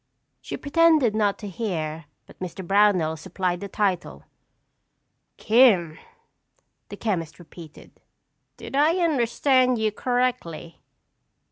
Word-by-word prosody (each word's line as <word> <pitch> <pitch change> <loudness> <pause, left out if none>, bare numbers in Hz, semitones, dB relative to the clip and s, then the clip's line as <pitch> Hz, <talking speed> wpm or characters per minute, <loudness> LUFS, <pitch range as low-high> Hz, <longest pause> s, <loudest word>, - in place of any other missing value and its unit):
She - - -6
pretended 305 -5 +3
not 210 -2 0
to 210 - -8
hear 165 -6 -4 0.2
but - - -18
Mr. 185 0 -7
Brownell 195 -5 +2
supplied 180 +1 -3
the 200 - -6
title. 195 -3 -2 1.1
"'Kim,'" 210 -9 +3 0.9
the - - -9
chemist 170 -8 -3
repeated. 165 -2 -14 0.7
"Did - - -8
I 300 +4 +3
understand 255 -5 +2
you 220 -1 0
correctly?" 245 -10 -3
205 Hz, 105 wpm, -24 LUFS, 175-250 Hz, 1.1 s, pretended